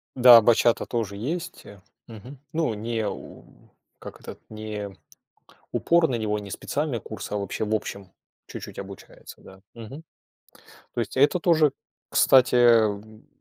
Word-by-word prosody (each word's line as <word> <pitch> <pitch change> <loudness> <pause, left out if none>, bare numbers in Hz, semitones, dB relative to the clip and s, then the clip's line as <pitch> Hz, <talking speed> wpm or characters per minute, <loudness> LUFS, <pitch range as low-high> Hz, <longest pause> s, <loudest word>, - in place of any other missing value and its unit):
Да, 120 -2 +9
бачата 120 +1 +3
тоже 105 -5 -3
есть, 170 - -5
э. 100 -2 -13 0.3
Мгм. 120 +5 -12
Ну, 155 -8 0
не 110 0 -3
у - - -8 0.6
как - - -11
этот - - -10
не 105 -2 -7 0.8
упор 170 -2 +2
на 125 - -1
него, 105 -1 -2
не 100 -1 -9
специальный 140 +2 -3
курс, 105 -1 -8
а 105 - -2
вообще, 100 +1 -3
в 110 +1 -1
общем, 100 -3 -5 0.3
чуть-чуть - - -9
обучается, 100 0 -11
да. 95 0 -15
Мгм. 115 +7 -10 0.9
То - - -3
есть 115 - -5
и - - +2
это 145 +6 +4
тоже, 160 -4 +3 0.4
кстати, 130 -1 +4
эм, 110 -3 +2
115 Hz, 150 wpm, -25 LUFS, 105-130 Hz, 0.9 s, Да